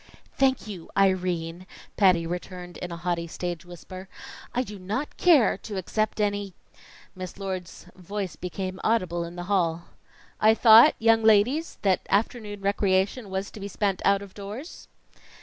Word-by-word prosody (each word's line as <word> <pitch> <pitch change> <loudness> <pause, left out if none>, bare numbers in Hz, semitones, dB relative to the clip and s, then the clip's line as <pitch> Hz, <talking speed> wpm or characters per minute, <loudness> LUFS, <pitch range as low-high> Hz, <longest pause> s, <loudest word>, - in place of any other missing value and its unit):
"Thank 265 -1 +2
you, 195 -6 -8
Irene," 180 -2 0 0.3
Patty 180 -4 +4
returned 180 +1 -6
in 180 - -6
a 170 - -5
haughty 170 -1 -2
stage 175 +1 -5
whisper. 185 +2 -10 0.4
"I 250 - 0
do 210 -5 -9
not 215 +11 -4
care 320 -10 +4
to 205 -3 -6
accept 215 +4 -1
any 205 -3 -1 0.3
" - - -22
Miss 185 -1 -7
Lord's 190 -3 -6
voice 190 0 -5
became 185 +1 -5
audible 185 -7 +1
in 170 +1 -8
the 175 - -5
hall. 175 -3 0 0.6
"I 220 +1 +5
thought, 230 +6 +8
young 225 0 +4
ladies, 225 +10 +3
that 190 -2 +3
afternoon 205 -1 -1
recreation 200 +2 +1
was 190 +1 -3
to - - -10
be 200 - -5
spent 200 -1 -1
out 200 0 +3
of 195 -2 -12
doors?" 210 - -8
195 Hz, 155 wpm, -26 LUFS, 180-215 Hz, 0.6 s, thought